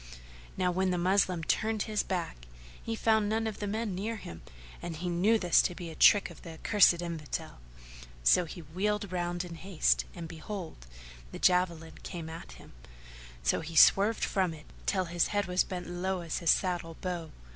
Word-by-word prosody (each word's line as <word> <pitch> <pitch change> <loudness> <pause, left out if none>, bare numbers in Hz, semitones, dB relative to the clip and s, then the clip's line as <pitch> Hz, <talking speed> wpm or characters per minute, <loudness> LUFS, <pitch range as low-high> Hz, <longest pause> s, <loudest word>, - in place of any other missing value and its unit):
Now 180 -1 +1
when 185 +1 +1
the 180 - 0
Moslem 185 -1 +2
turned 215 +5 0
his 215 -1 -1
back, 165 - -4 0.3
he 225 - -3
found 220 -2 +2
none 225 +1 0
of 220 -2 -4
the 205 - -3
men 215 0 -2
near 210 +5 -3
him, 85 - -9 0.4
and 170 -2 -5
he 175 +3 -4
knew 190 +6 +3
this 180 -5 +4
to 180 - -2
be 170 -2 -7
a - - -10
trick 205 +4 +5
of - - -14
the 165 - -9
accursed 175 0 +4
Infidel; 160 - -5 0.6
so 175 - +5
he 170 +2 -8
wheeled 200 +5 -2
round 175 0 -2
in 175 - -8
haste 175 0 +1
and 170 -2 -6
behold, 160 - -8 0.4
the - - -7
javelin 175 -3 +1
came 165 -2 -6
at 165 +1 -9
him, - - -15 0.7
so - - +2
he 165 +1 -7
swerved 205 +7 +6
from 185 -5 0
it, 150 - -14 0.2
till 185 -2 +1
his 175 0 +1
head 205 -1 0
was 180 0 +2
bent 180 -2 -6
low 180 +1 -2
as 165 -2 -3
his 170 -3 0
saddle 175 -3 +1
bow. 175 -4 -4
180 Hz, 190 wpm, -30 LUFS, 165-200 Hz, 0.7 s, swerved